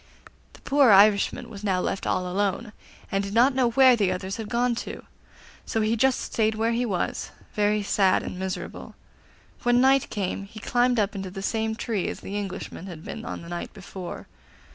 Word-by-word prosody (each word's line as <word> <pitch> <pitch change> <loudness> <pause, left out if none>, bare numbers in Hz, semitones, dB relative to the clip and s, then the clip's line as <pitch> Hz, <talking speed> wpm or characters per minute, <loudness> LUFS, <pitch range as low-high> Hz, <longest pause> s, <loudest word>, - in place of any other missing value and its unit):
The - - -16
poor 275 -2 +4
Irishman 200 0 +5
was 205 -2 -10
now 190 -3 +1
left 195 - -2
all 185 - 0
alone, 205 +4 -1 0.4
and 195 0 +1
did 200 +2 -5
not 250 +4 +5
know 255 -2 +2
where 255 +1 +6
the 200 -5 +1
others 185 +1 -4
had 220 -2 -6
gone 240 +1 +1
to, - - -6 0.6
so 225 - -1
he 215 +2 +1
just 265 +2 +2
stayed 220 -1 0
where 225 +1 +1
he 240 +1 0
was, 185 -5 -2 0.2
very 210 0 +1
sad 195 -1 +2
and 180 - -6
miserable. 190 -1 -5 0.7
When 245 0 +3
night 270 +1 +4
came 195 -1 -3
he 215 +2 -11
climbed 245 +1 +2
up 205 -1 +1
into 190 -1 -5
the 195 +1 -7
same 220 +1 -1
tree 220 -5 -2
as - - -5
the 200 - -6
Englishman 195 -2 -5
had 165 -4 -9
been - - -6
on - - -6
the 170 - -10
night 175 +3 -6
before. 190 -2 -8
210 Hz, 195 wpm, -25 LUFS, 195-235 Hz, 0.7 s, where